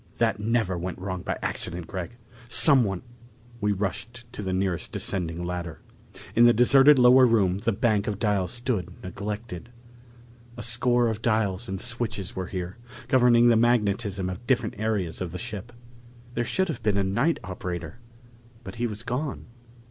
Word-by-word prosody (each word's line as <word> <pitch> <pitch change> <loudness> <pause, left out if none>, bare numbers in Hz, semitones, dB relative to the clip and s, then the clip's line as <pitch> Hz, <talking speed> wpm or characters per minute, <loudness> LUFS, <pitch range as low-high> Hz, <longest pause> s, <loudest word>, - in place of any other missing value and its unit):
"That 110 -3 +1
never 105 -4 0
went 90 +1 -5
wrong 95 -1 -5
by - - -3
accident, 90 -1 -2
Gregg! 95 +6 -6 0.3
Someone 120 - +5 0.3
" 120 +1 -25
We 105 0 +1
rushed 115 +5 -4
to - - -6
the 95 -2 -3
nearest 95 -2 -1
descending 85 -2 -2
ladder. 85 -2 -5 0.6
In 120 - +6
the 120 - +6
deserted 135 +5 +6
lower 125 +1 +7
room 100 -5 +2
the 110 +3 0
bank 105 -1 0
of 105 -2 -2
dials 100 -5 0
stood 115 -7 -2
neglected. 100 +1 -6 0.9
A 120 - -5
score 120 +1 +3
of 110 -1 -3
dials 110 -3 0
and 95 0 -4
switches 115 -5 -3
were 95 -1 -4
here, 90 +1 -5 0.3
governing 120 -2 +5
the 115 - +5
magnetism 105 -4 +1
of 95 +6 -7
different 130 -3 +1
areas 105 -7 -2
of 90 -3 -3
the 90 - -5
ship. 105 +5 -6 0.6
There 120 0 -1
should 190 +8 0
have 135 -6 -4
been 105 -2 +1
a 100 - +2
night 120 +13 +1
operator, 90 +2 -6 0.6
but 120 - -9
he 120 +1 0
was 110 0 -5
gone. 125 +4 -4
105 Hz, 165 wpm, -25 LUFS, 95-120 Hz, 0.9 s, lower